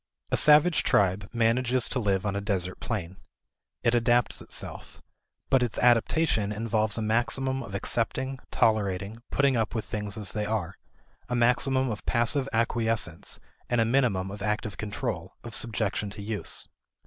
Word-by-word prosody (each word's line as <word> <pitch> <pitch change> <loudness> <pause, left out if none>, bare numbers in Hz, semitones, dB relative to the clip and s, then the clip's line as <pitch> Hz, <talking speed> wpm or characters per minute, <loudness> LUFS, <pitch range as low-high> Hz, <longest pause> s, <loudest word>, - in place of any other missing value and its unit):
A - - +3
savage 155 +2 +5
tribe 95 0 +2
manages 120 +1 +1
to 130 - -1
live 100 -3 0
on 100 -1 -1
a 100 - -1
desert 95 -3 -1
plain. 95 -5 -4 0.7
It 115 - +3
adapts 120 0 +2
itself. - - -5 0.5
But 135 - +5
its 120 -3 -1
adaptation 120 -2 +3
involves 110 0 0
a 110 - -1
maximum 130 +4 0
of 100 - -7
accepting, 130 +5 0
tolerating, 105 0 0
putting 140 -2 +2
up 115 0 -1
with 110 - -2
things 105 -1 -3
as 105 -3 0
they 105 -1 -2
are, 95 -5 -2 0.5
a 125 - -1
maximum 130 +2 +2
of 105 - -6
passive 130 +3 +2
acquiescence, 115 -6 0 0.3
and 120 - +1
a 115 - +4
minimum 110 -7 +1
of 100 0 -8
active 105 0 -2
control, 105 -4 -4
of 115 - -7
subjection 110 -2 0
to 100 0 -8
use. 105 0 -3
110 Hz, 155 wpm, -27 LUFS, 100-120 Hz, 0.7 s, savage